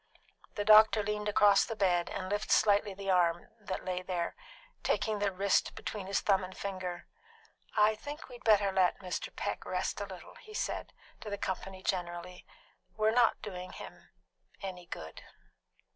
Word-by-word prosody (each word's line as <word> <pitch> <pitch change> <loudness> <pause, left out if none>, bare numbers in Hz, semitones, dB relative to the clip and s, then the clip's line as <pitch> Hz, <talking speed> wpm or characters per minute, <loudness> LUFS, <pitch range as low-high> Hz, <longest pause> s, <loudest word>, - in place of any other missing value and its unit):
The 205 - -2
doctor 215 0 +7
leaned 210 0 -2
across 205 -1 +5
the 225 - -4
bed 180 -4 +2
and 185 -1 -4
lifted 205 +2 -2
slightly 205 -1 +3
the 195 0 -2
arm 175 -2 +2
that 190 -3 -5
lay 180 -1 -2
there, 180 -2 -3 0.5
taking 215 -1 0
the 200 -1 +1
wrist 195 +1 +1
between 200 -3 -5
his 195 - 0
thumb 195 -2 +3
and 185 0 -8
finger. 185 -3 -4 0.7
"I 210 +1 +5
think 290 +8 -8
we 255 - -13
had 245 - -12
better 205 -3 +4
let 190 -1 +3
Mr. 180 -2 -4
Peck - - -3
rest - - -2
a - - -2
while," - - -10
he 430 -2 -12
said - - -3 0.3
to 215 - -7
the 205 - -3
company 190 0 -4
generally, 180 0 -3 0.5
"We're 215 0 +3 0.3
doing 185 -3 -6
him - - -11 0.5
no 180 -2 -6
good." 80 0 -7
195 Hz, 165 wpm, -32 LUFS, 185-210 Hz, 0.7 s, doctor